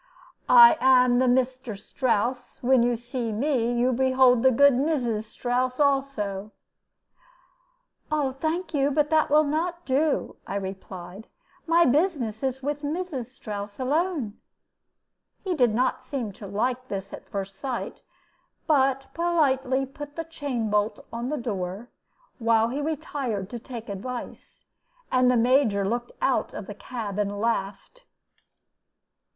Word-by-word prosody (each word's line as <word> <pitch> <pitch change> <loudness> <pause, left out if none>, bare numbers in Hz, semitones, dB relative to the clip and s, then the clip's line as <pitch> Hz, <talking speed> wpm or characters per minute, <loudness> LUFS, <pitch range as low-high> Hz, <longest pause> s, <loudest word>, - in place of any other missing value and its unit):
"I 475 -8 +9
am 250 -1 +5
the 260 - +3
Meesther 255 -2 0
Strouss; 245 +3 -2
when 255 0 +4
you 240 0 +2
see 240 0 -4
me, 240 +1 0
you 245 +1 +2
behold 260 -1 +4
the 260 - +6
good 280 +3 +5
Meeses 245 -6 0
Strouss 250 +3 -1
also." 265 -8 0 1.6
"Thank 305 +5 -1
you, 280 -1 +2
but 295 +1 +1
that 310 -1 +3
will 300 +1 +5
not 340 +4 -2
do," 285 +3 0
I 195 - -4
replied; 190 0 -7 0.4
"my 335 +1 +5
business 270 - +1
is 265 -1 -2
with 290 +1 -2
Mrs. 300 -4 -3
Strouss 205 -4 -7
alone." 285 - -1 1.0
He 380 -3 -1
did 250 -8 +3
not 255 +2 +1
seem 245 -7 -4
to 200 +1 -10
like 245 +6 -2
this 195 -2 -5
at - - -10
first 195 -1 -5
sight, 260 0 -5 0.6
but 270 -3 +2
politely 270 -6 +1
put 290 +2 -10
the 330 - -3
chain 280 -9 -3
bolt 210 +1 0
on 235 +2 -3
the 300 - -1
door 205 -2 -4 0.5
while 230 -1 +3
he 275 +4 -3
retired 280 -10 -3
to 240 - -5
take 235 -1 -8
advice; 235 +5 -7 0.5
and 255 -1 +4
the 250 - +3
Major 230 -5 +3
looked 240 +3 -2
out - - +1
of - - -6
the - - -7
cab 215 -5 -6
and 205 0 -1
laughed. 230 - -3
255 Hz, 135 wpm, -26 LUFS, 225-285 Hz, 1.6 s, I